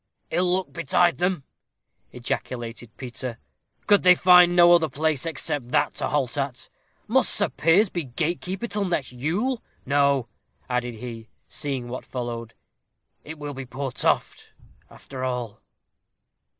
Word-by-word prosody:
"Ill 180 +2 +1
luck 185 +1 -1
betide 170 +1 +2
them!" 180 -4 0 0.7
ejaculated 120 -1 -5
Peter; 125 -1 -6 0.5
"could 205 -1 +5
they 180 0 +7
find 180 -1 +6
no 175 0 +7
other 165 -2 +4
place 155 +1 0
except 145 -4 -2
that - - +1
to - - -2
halt 140 -2 -1
at? 135 -3 -4 0.4
Must - - +4
Sir - - +3
Piers 180 +7 +3
be 175 - -2
gatekeeper 175 - -2
till 210 -3 -1
next 165 -8 -2
Yule! 185 - -1 0.2
No," 140 -2 +2 0.4
added 125 -1 -2
he, 115 -1 -8 0.2
seeing 135 -4 -3
what 125 +1 -6
followed; 120 -2 -6 0.7
"it 155 +1 -8
will 145 -1 -6
be 135 -1 -7
poor 135 +1 -4
Toft, - - -1 0.4
after 130 -2 -9
all." 125 -4 -3
140 Hz, 135 wpm, -24 LUFS, 125-175 Hz, 0.7 s, they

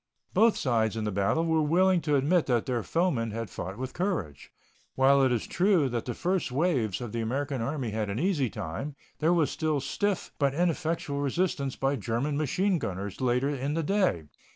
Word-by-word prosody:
Both 225 0 +4
sides 115 -4 +1
in 110 - -2
the 105 - -1
battle 100 - +1
were 160 -1 +2
willing 180 +4 +3
to 150 -2 +1
admit 155 +5 +2
that 120 -3 +1
their 125 -2 -1
foemen 155 -7 0
had 115 -2 -5
fought 95 +3 -6
with 130 +1 -5
courage. 165 - -3 0.4
While 135 +1 +5
it 130 -1 +3
is 120 -3 0
true 180 -7 +2
that 120 -2 -3
the 120 - -4
first 180 -5 -1
waves 130 - 0
of 120 -3 -5
the 115 - -2
American 135 +3 -2
Army 130 -2 -2
had 105 -1 -2
an 100 - -3
easy 150 - +1
time, 120 - -5 0.2
there 160 +2 +3
was 165 -4 +2
stiff 160 +6 -1
but 140 -2 +2
ineffectual 165 -3 -1
resistance 140 -2 -1
by 135 +1 0
German 120 +7 -1
machine 175 +6 +1
gunners 100 -3 -5
later 125 +2 +2
in 140 +1 -2
the 165 - 0
day. 185 - +1
140 Hz, 190 wpm, -28 LUFS, 115-165 Hz, 0.4 s, While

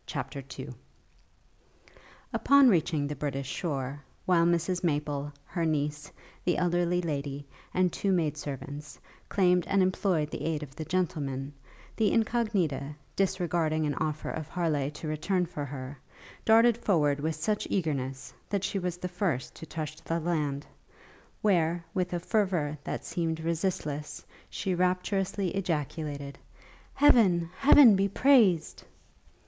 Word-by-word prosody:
CHAPTER 140 - -5
II 135 +1 -6 1.6
Upon 280 -2 +6
reaching 160 -6 +2
the 145 +1 -3
British 140 -2 -3
shore, 140 -4 -3 0.2
while 170 -2 +4
Mrs 175 +1 0
Maple, 145 -3 -1
her 170 - -3
niece, 150 -1 -1 0.3
the 175 - +1
elderly 175 0 +1
lady, 145 -3 -3 0.3
and 185 -1 +1
two 200 - 0
maid 160 -5 +1
servants, 145 +1 -7 0.3
claimed 180 -2 +3
and 195 -1 +3
employed 185 -4 +1
the - - -5
aid 160 -2 -1
of 135 -2 -11
the 155 - -5
gentlemen, 145 -6 -2 0.4
the 220 -2 +2
Incognita, 195 - 0 0.2
disregarding 170 -5 0
an 145 - 0
offer 155 +1 -2
of 155 -2 -5
Harleigh 155 -5 0
to 150 +2 -8
return 175 +4 0
for 150 -4 -5
her, 135 0 -7 0.5
darted 230 +1 +6
forward 150 -10 +2
with 160 +2 -1
such 205 +7 -1
eagerness, 135 -7 -2 0.2
that 200 -2 -1
she 200 0 -1
was 180 -1 -3
the 180 - -4
first 175 -9 -2
to 160 - -9
touch 155 -1 -5
the 165 +1 -2
land, 150 -4 -1 0.8
where, 170 -4 +2
with 180 -1 -1
a 175 - -1
fervour 180 -6 0
that - - -4
seemed 165 -2 -2
resistless, 160 -3 -3 0.2
she 190 -2 -2
rapturously 185 +2 0
ejaculated, 150 -5 -3 0.6
'Heaven, 185 - +5
Heaven 275 -5 +8
be 195 +1 +2
praised!' 200 - +3
165 Hz, 135 wpm, -29 LUFS, 150-185 Hz, 1.6 s, Heaven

